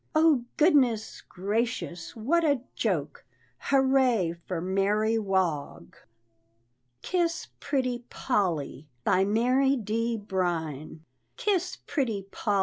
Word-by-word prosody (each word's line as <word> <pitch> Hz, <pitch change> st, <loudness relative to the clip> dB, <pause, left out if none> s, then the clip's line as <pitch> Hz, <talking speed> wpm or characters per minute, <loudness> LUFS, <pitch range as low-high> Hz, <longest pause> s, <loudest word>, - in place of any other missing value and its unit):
Oh, 310 Hz, -6 st, +4 dB
goodness 265 Hz, -9 st, +3 dB
gracious! 200 Hz, -3 st, -3 dB
what 295 Hz, +10 st, +1 dB
a 285 Hz, -5 st, +2 dB
joke! -, -, -2 dB, 0.4 s
Hurrah 265 Hz, -8 st, +3 dB, 0.2 s
for 180 Hz, -3 st, -2 dB
Mary 205 Hz, +5 st, +1 dB
Wog!" 190 Hz, -8 st, -1 dB, 1.1 s
"KISS 335 Hz, -3 st, -1 dB
PRETTY 255 Hz, -3 st, -1 dB
POLL!" 165 Hz, -, -1 dB, 0.2 s
BY 190 Hz, +5 st, +3 dB
MARY 255 Hz, +6 st, +3 dB
D. 230 Hz, 0 st, -1 dB
BRINE. 165 Hz, -7 st, -3 dB, 0.3 s
"Kiss 400 Hz, -7 st, 0 dB
Pretty 230 Hz, -9 st, -1 dB
Poll!" 205 Hz, -2 st, 0 dB
225 Hz, 95 wpm, -27 LUFS, 190-270 Hz, 1.1 s, Oh